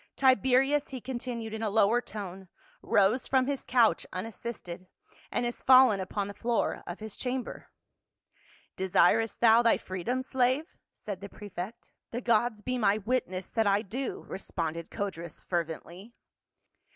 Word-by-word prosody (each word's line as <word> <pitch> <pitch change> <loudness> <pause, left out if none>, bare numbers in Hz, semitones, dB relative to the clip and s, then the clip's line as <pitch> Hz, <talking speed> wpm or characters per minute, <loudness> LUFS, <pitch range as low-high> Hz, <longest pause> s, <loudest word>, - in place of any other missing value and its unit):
" - - -55
Tibe 260 -5 +4
rius," 270 +3 +3
he 260 - -6
continued, 240 -3 -5
in 220 - -4
a 220 - 0
lower 220 +3 +3
tone, 195 -4 -8 0.3
"rose 205 +6 +2
from 260 -1 +3
his 280 0 -2
couch 240 -3 +3
unassisted, 185 -3 -6 0.4
and 240 - 0
is 240 - -4
fallen 255 -5 +7
upon 195 +2 -3
the 205 - -7
floor 230 +3 -1
of 175 - -6
his 220 -1 -7
chamber." 255 0 -4 1.1
"Desirest 190 +4 +2
thou 230 0 +7
thy 230 -1 +4
freedom, 225 +8 -3
slave?" 260 +3 +1 0.3
said 200 -3 -7
the 200 - -7
prefect. 205 +3 -8 0.2
"The 235 - -3
gods 230 -2 +1
be 255 +2 -2
my 210 -2 +3
witness 205 -4 -2
that 225 -2 +1
I 200 +1 +3
do," 250 +6 -4
responded 165 -3 -4
Codrus 170 -5 -5
fervently. 175 +5 -4
220 Hz, 150 wpm, -29 LUFS, 195-250 Hz, 1.1 s, fallen